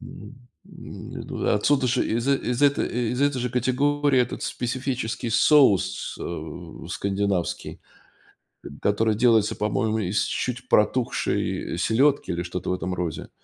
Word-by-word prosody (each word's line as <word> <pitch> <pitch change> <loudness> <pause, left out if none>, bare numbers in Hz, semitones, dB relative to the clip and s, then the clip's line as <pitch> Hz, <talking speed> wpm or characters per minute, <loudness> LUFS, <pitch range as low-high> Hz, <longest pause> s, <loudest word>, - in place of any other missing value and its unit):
Мгм. 105 +7 -11 0.3
М, - - -10
не - - -6
туда - - -1
отсюда 135 +5 +2
ж 125 +1 +1
из 115 +3 -1
э, 140 - +4
из 125 0 -3
этой 140 0 +3
э, 120 -1 -2
из 125 - -3
этой 145 -2 +2
же 125 - -2
категории, 135 +2 +2
этот 125 - -2
специфический 125 -2 -3
соус, 130 - +3
э, 80 0 -7
скандинавский, 100 -2 -2 0.8
э, - - -8
который 105 +1 +1
делается, 115 -2 +3
по-моему, 110 +1 0
из 100 +1 0
чуть 125 0 -3
протухшей 105 -5 0
селедки, 135 +6 +2
или 85 0 -2
что-то 90 +1 -5
в - - +1
этом 90 0 -3
розе. 85 -3 -4
115 Hz, 145 wpm, -24 LUFS, 100-130 Hz, 0.8 s, э